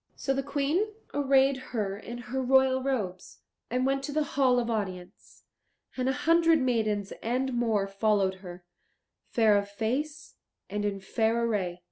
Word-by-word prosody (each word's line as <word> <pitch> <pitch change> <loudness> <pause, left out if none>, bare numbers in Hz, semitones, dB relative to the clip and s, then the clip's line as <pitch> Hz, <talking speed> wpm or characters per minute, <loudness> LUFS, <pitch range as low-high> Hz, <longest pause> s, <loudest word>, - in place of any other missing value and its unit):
So 270 - -1
the 270 - 0
Queen 285 +8 0 0.3
arrayed 275 -1 +3
her 215 -6 -3
in 235 +4 -8
her 245 +2 -4
royal 260 0 +3
robes, 210 -9 -3 0.3
and 250 +2 0
went 275 0 +1
to 290 - -5
the 305 +1 +1
hall 255 -3 +3
of 235 - -2
audience, 190 -5 -5 0.5
and 255 0 0
a - - +3
hundred 330 +4 +4
maidens 215 -6 0
and 255 +3 -1
more 225 -4 +1
followed 195 -1 +1
her, 180 -2 -10 0.6
fair 220 -4 +4
of 200 0 -6
face 275 +9 -3 0.3
and 205 0 -2
in 200 -1 -2
fair 225 +3 0
array. 185 -6 -1
240 Hz, 155 wpm, -28 LUFS, 205-270 Hz, 0.6 s, hundred